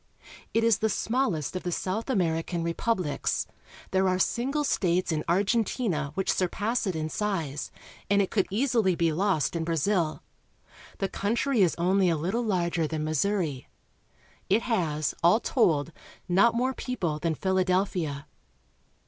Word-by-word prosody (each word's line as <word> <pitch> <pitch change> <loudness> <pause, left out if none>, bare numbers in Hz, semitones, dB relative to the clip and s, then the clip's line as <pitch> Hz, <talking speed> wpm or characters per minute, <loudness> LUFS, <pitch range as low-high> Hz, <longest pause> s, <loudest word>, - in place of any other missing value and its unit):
It 225 - +1
is 230 -2 +4
the 220 - +1
smallest 205 - -1
of 185 - -2
the 180 - -3
South 195 +8 -2
American 170 -5 0
republics. 170 -1 -1 0.5
There 190 0 +2
are 185 - +1
single 265 +9 0
states 180 -9 +1
in 155 -1 -1
Argentina 195 - +1
which 190 - +1
surpass 205 +5 -1
it 185 - -1
in 155 -1 -2
size, 160 -6 -2 0.4
and 200 0 +4
it 195 - +1
could 195 -4 +1
easily 220 -4 +2
be 165 -1 +1
lost 185 -2 +1
in 165 - -1
Brazil. 165 0 0 0.7
The 195 - -1
country 230 +5 0
is 180 -3 +3
only 185 +2 +2
a 165 - +1
httle 190 +10 -1
larger 175 -6 0
than 155 0 -3
Missouri. 155 -2 -1 0.8
It 215 +5 +3
has, 160 - 0
alltold, 170 - +3 0.4
not 200 +6 +4
more 255 +2 +1
people 175 -14 -3
than 160 0 -1
Philadelphia. 185 -5 0
185 Hz, 140 wpm, -27 LUFS, 165-215 Hz, 0.8 s, is